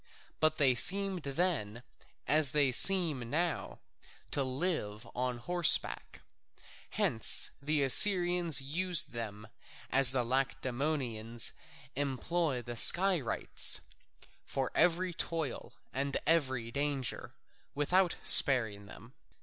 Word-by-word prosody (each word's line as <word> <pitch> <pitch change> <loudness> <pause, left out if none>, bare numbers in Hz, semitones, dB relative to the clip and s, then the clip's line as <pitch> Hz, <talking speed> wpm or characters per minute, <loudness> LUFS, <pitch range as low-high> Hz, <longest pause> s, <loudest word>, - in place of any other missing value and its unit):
But 155 0 0
they 135 -4 +2
seemed 190 - +2
then, 140 - -3 0.4
as 150 -3 +2
they 145 -3 +1
seem 155 -6 +3
now, 170 +5 -3 0.5
to 140 - 0
live 130 - -3
on 125 0 -4
horseback. 175 +7 -1 0.7
Hence 110 - +1
the 145 0 -1
Assyrians 175 +1 +3
used 170 +5 -1
them 110 -3 -8 0.4
as 135 -1 +4
the 130 -1 -1
Lacedaemonians 125 -3 -2 0.4
employ 140 0 -3
the 120 0 -8
Skirites, 180 - +2 0.6
for 135 -2 -5
every 175 +2 +1
toil 160 -5 -5 0.2
and 140 +1 -3
every 130 -8 -1
danger, 140 -2 -4 0.4
without 175 +5 0
sparing 110 -8 +5
them. 115 +5 -15
140 Hz, 100 wpm, -30 LUFS, 125-170 Hz, 0.7 s, sparing